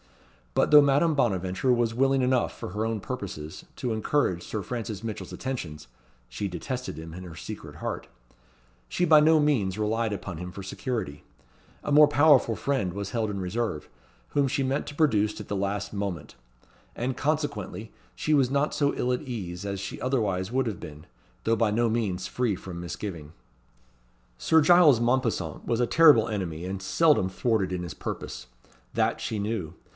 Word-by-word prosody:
But - - +3
though 150 0 +10
Madame 145 +3 +3
Bonaventure 95 -3 +1
was 120 -2 +2
willing 135 +2 +2
enough, 125 -1 +1
for - - -5
her 105 +4 -2
own 115 -1 -1
purposes, 95 -10 -6
to 120 -3 -2
encourage 110 -5 0
Sir 105 -2 -4
Francis 115 -3 -5
Mitchell's 110 -2 -5
attentions 85 -13 -5 0.4
(she 80 +12 -4
detested 125 - -5
him 80 0 -8
in 90 +2 -8
her 85 -3 -9
secret - - -8
heart), - - -4 0.8
she 180 - +1
by 155 -2 +7
no 155 +1 +5
means 115 -11 +1
relied 110 +1 0
upon 95 -4 -5
him 90 0 -6
for 100 +2 -8
security. 95 - -4 0.6
A - - -3
more 150 +1 +8
powerful 145 -7 +5
friend 130 -11 -1
was 100 0 -5
held 115 -3 -1
in 100 -1 -3
reserve, 95 -3 -2 0.4
whom 140 -1 +2
she 135 +1 0
meant 135 +2 -1
to 145 - -7
produce 110 -10 +2
at 105 - -8
the 100 - -2
last 100 +2 -2
moment; 100 -7 -4 0.6
and, 125 +2 -2
consequently, 145 -7 -2 0.2
she 155 - 0
was 135 -4 +4
not 140 +2 +1
so 145 -1 +1
ill 125 +1 0
at 125 - -2
ease 100 - -6
as 100 -1 -3
she 100 - -6
otherwise 105 -7 0
would 130 +1 +1
have 110 -6 -3
been, 75 +1 -10 0.4
though 115 - +3
by 115 -1 +2
no 115 +2 +2
means 100 -5 -1
free 120 -5 0
from 90 -1 -8
misgiving. 85 -3 -6 1.1
Sir 160 - +4
Giles 155 -5 +6
Mompesson 120 0 0
was 115 - 0
a 120 - +2
terrible 150 -8 +6
enemy, 90 -6 -3
and 95 +1 -4
seldom 145 - +3
thwarted 100 -1 0
in 90 -1 -2
his 85 -3 -6
purpose. - - -6 0.5
That - - +1
she 110 - -2
knew. 100 -6 -3
110 Hz, 175 wpm, -27 LUFS, 95-130 Hz, 1.1 s, though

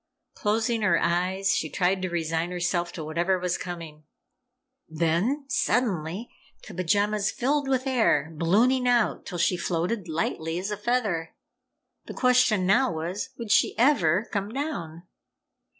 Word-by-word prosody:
Closing 225 +2 0
her 190 -5 +3
eyes, 185 +3 +1
she 155 - -2
tried 185 +2 0
to 185 - -2
resign 165 0 -1
herself 175 -1 -1
to 160 - -6
whatever 170 +5 0
was 180 -1 -1
coming. 165 -4 -8 0.8
Then, 170 - 0
suddenly, 210 - 0 0.4
the 215 - -9
pajamas 205 +3 +1
filled 280 +3 0
with 260 -1 0
air, 225 - +2
ballooning 230 +11 +2
out 240 -3 +1
till 180 - -5
she 175 +2 +2
floated 175 +4 -2
lightly 160 0 -2
as 195 +4 -3
a 210 - -3
feather. 205 -7 -1 0.7
The - - -7
question 250 -6 +3
now 200 +4 +3
was 170 +9 -4
would 230 -3 -5
she - - +3
ever 220 - +3
come 200 -1 -2
down? 215 - -5
185 Hz, 140 wpm, -26 LUFS, 170-230 Hz, 0.8 s, her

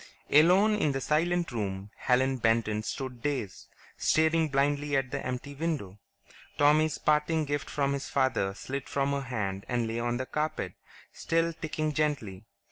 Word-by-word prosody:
Alone 180 +8 +6
in 155 -9 +1
the 135 - -1
silent 170 +3 +1
room, 100 -3 -4
Helen 130 +1 +2
Benton 115 -2 +1
stood 125 +2 -5
dazed, 130 -9 -3 0.3
staring 160 0 +2
blindly 145 +1 +1
at 135 -2 -1
the - - -3
empty 130 +3 -4
window. 140 - -3 0.6
Tommy's 150 +1 +4
parting 155 +1 +2
gift 145 0 -3
from 140 -1 0
his 140 -1 -4
father 130 -8 +1
slid 135 +4 -5
from 140 0 0
her 140 0 -1
hand 100 -7 -3
and 120 -1 0
lay 115 +1 -3
on 120 0 -1
the 130 - -3
carpet, 150 +3 -2 0.4
still 165 0 0
ticking 155 -1 -3
gently. 140 -10 -2
140 Hz, 155 wpm, -29 LUFS, 120-155 Hz, 0.6 s, Alone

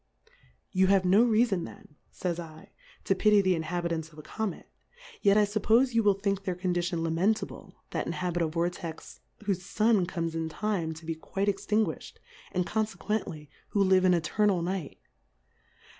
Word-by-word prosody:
You 185 0 +3
have 195 -1 +4
no 195 +5 +6
reafon 225 -6 +2
then, - - -13 0.2
fays 175 -2 -3
7, 160 -2 -9 0.4
to - - +2
pity 210 +2 +4
the 190 -2 +3
Inhabitants 165 -1 -2
of 155 - -18
a 155 - -9
Comet, 220 -1 -4 0.5
yet 200 -1 +5
I 210 - +5
fuppofe 220 +5 +2
you 230 - +4
will 205 -2 +4
think 195 0 -1
their 185 -2 -2
Condition 175 -2 -1
lamentable, 175 +7 -1 0.2
that - - -2
inhabit 175 -1 -2
a 165 - +2
Vortex 170 0 -4 0.2
whofe 200 -3 0
Sun 205 0 +2
comes 165 -2 -3
in 165 0 -2
Time 170 -3 -2
to 160 +1 -12
be 165 - -2
quite 195 +5 -3
extin 210 +2 +1
guilhed, - - -7 0.4
and 180 -1 0
confequently 210 -8 -3 0.2
who 200 -1 +2
hve 185 0 +4
m 180 -1 +5
Eternal 180 +2 +1
Night. 180 -4 -3
185 Hz, 165 wpm, -29 LUFS, 170-205 Hz, 0.5 s, no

